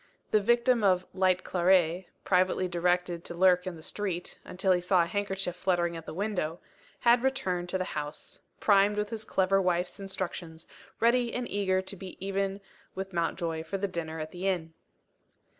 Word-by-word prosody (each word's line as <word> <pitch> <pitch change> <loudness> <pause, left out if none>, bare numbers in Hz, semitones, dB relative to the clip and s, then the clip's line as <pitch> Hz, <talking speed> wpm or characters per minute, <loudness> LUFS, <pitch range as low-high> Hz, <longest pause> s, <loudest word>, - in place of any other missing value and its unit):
The 215 - +4
victim 240 +2 +3
of 185 -2 +3
"light 185 -1 +2
claret" 180 -1 +2 0.2
privately 185 0 +2
directed 175 0 0
to 170 - -6
lurk 180 0 +4
in 185 - -4
the 160 - -11
street, 185 -3 -3
until 190 +1 0
he 180 -1 +3
saw 180 0 +3
a - - -1
handkerchief 195 -1 -2
fluttering 175 -2 0
at 165 -1 -8
the - - -5
window 180 -5 -2 0.4
had 235 0 +5
returned 190 -10 -1
to 190 - 0
the 185 - -1
house; 150 -3 -6 0.2
primed 205 0 +4
with 210 0 -1
his 220 -1 -4
clever 195 -2 +2
wife's 180 +1 0
instructions; 175 -4 -5 0.3
ready 235 +1 +3
and 245 -1 -3
eager 190 -2 0
to 190 +1 -5
be 190 0 -9
even 195 +1 -2 0.3
with 190 0 -5
Mountjoy 165 -1 -1
for 195 +4 -4
the 200 +1 -1
dinner 160 -3 -4
at 155 0 -5
the 180 +2 -4
inn. 165 -4 -1
185 Hz, 175 wpm, -29 LUFS, 175-195 Hz, 0.4 s, had